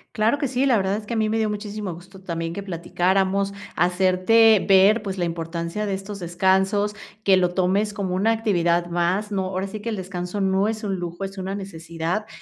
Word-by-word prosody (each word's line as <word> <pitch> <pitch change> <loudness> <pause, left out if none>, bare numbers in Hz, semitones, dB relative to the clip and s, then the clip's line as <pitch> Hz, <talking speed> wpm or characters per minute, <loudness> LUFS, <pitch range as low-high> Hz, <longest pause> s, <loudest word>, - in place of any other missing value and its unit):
Claro 225 +6 +2
que 280 - -1
sí, 260 +2 +1
la 250 -4 +4
verdad 195 0 0
es 210 -1 -8
que 235 - -3
a - - 0
mí 220 -1 +2
me 220 +1 0
dio 220 -1 +1
muchísimo 210 -1 -4
gusto 190 +2 -14
también 165 -2 -4
que 200 - -5
platicáramos, 190 +2 0 0.2
hacerte 185 +4 +4
ver, 195 +4 +6
pues, 195 -2 -5
la 175 - 0
importancia 170 +4 -3
de 195 - -1
estos 200 +1 -7
descansos, 190 +4 +1 0.3
que 195 -1 +5
lo 180 -1 +1
tomes 200 +3 +1
como 190 -3 -2
una 200 +5 +2
actividad 175 -6 +1
más, 180 +5 0
¿no?, 190 -2 -1
ahora 185 0 -2
sí 195 +2 -6
que, 220 +3 -4
el 220 - -2
descanso 185 0 -5
no 195 +1 +2
es 220 0 -3
un 195 -2 -2
lujo, 175 +2 -5
es 195 0 -6
una 190 +1 -3
necesidad, 170 +1 -4
195 Hz, 215 wpm, -23 LUFS, 180-210 Hz, 0.3 s, ver